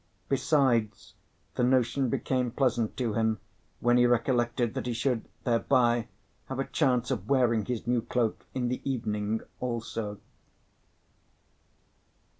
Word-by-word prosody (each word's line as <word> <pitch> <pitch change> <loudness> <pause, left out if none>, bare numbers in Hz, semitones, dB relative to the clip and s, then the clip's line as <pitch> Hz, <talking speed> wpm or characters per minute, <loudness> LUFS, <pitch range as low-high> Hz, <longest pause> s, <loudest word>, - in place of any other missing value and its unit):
Besides, 130 -6 +1 0.4
the - - 0
notion 130 +1 +2
became 125 +1 0
pleasant 120 -3 0
to 120 -4 -1
him 110 0 +1 0.4
when 120 +1 +4
he 120 0 +5
recollected 120 -1 +1
that - - -4
he 120 - -1
should 115 0 -1
thereby 120 -1 +2 0.4
have 130 - -5
a 135 - -1
chance 125 -4 +1
of 110 -5 -3
wearing 120 -6 +3
his 120 -1 -3
new 120 0 +1
cloak 120 -1 -1
in 125 -2 0
the 125 +1 -2
evening 110 -4 -1 0.2
also. 115 -4 -4
120 Hz, 125 wpm, -29 LUFS, 115-130 Hz, 0.4 s, he